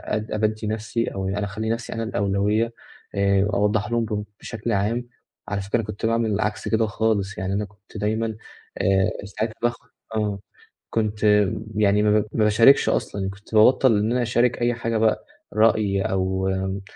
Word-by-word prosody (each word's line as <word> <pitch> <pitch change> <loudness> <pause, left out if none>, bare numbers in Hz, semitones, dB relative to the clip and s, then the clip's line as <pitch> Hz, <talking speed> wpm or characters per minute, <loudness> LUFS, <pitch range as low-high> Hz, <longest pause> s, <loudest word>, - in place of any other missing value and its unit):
آآ 110 0 -3
أبَدِّي 110 0 -1
نفسي 110 +2 -2
أو 95 -1 -3
يع 100 +2 -2
أخلّي 105 +2 -3
نفسي 115 +1 -3
أنا 115 0 -3
الأولوية 105 +2 0 0.4
آآ 100 0 +3
أوضّح 105 +2 +1
لهم 120 -1 +1
ب 105 -1 -3 0.2
بشكل 115 0 -4
عام، 115 +4 0 0.4
على 100 -1 -2
فكرة 100 +5 0
أنا 115 - -3
كنت 105 +1 -4
باعمل 115 -2 +1
عكس 105 0 -2
كده 110 0 +2
خالص، 105 -2 -1
يعني 95 +1 -2
أنا 105 +1 -1
كنت 105 +1 -15
دايمًا، 110 +1 -1 0.4
آآ 95 -1 +2
مستعد 105 +2 -3
أضخّم 120 -1 -1 0.3
آه، 105 -2 -1 0.5
كنت 110 -1 -1 0.5
يعني 105 0 +3
ما 105 0 +4
ب 105 - -3
ما 110 - +2
باشاركش 115 +6 +5
أصلًا، 95 -1 -1
كنت 105 +3 -9
بابطّل 120 +1 +5
إن 110 +2 0
أنا 125 +1 +1
أشارك 120 +1 +1
أي 120 0 +2
حاجة 115 -1 -2
بقى 110 0 +1 0.3
رأي 105 -3 +3
أو 95 0 0
آآ، 95 +1 -2
105 Hz, 175 wpm, -23 LUFS, 100-115 Hz, 0.5 s, باشاركش